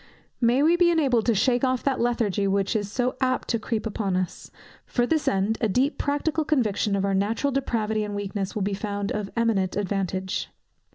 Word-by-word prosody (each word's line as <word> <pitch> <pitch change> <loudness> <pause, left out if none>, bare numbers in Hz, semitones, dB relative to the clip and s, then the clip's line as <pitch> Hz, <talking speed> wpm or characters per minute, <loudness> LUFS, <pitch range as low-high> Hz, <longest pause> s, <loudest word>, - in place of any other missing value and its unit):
May 245 +4 +4
we 330 +3 +5
be 350 -1 +5
enabled 270 -9 +2
to 230 - +3
shake 245 +5 +2
off 255 -1 +1
that 270 -2 0
lethargy 220 -4 +1
which 195 +2 0
is 205 -2 -1
so 250 +3 0
apt 255 -1 0
to 230 - +1
creep 220 0 -3
upon 205 -3 -1
us! 185 -1 -4 0.4
For 240 - +1
this 315 +3 0
end, 200 +3 +1
a 220 - +2
deep 260 +9 +1
practical 295 +2 0
conviction 215 -9 +1
of 195 0 0
our 200 - 0
natural 220 +8 0
depravity 220 -5 -1
and 205 -1 -4
weakness 200 -1 -3
will 210 - -1
be 200 +1 -1
found 200 0 -3
of 210 -2 -3
eminent 210 -5 +1
advantage. 190 -2 -2
220 Hz, 195 wpm, -25 LUFS, 200-255 Hz, 0.4 s, we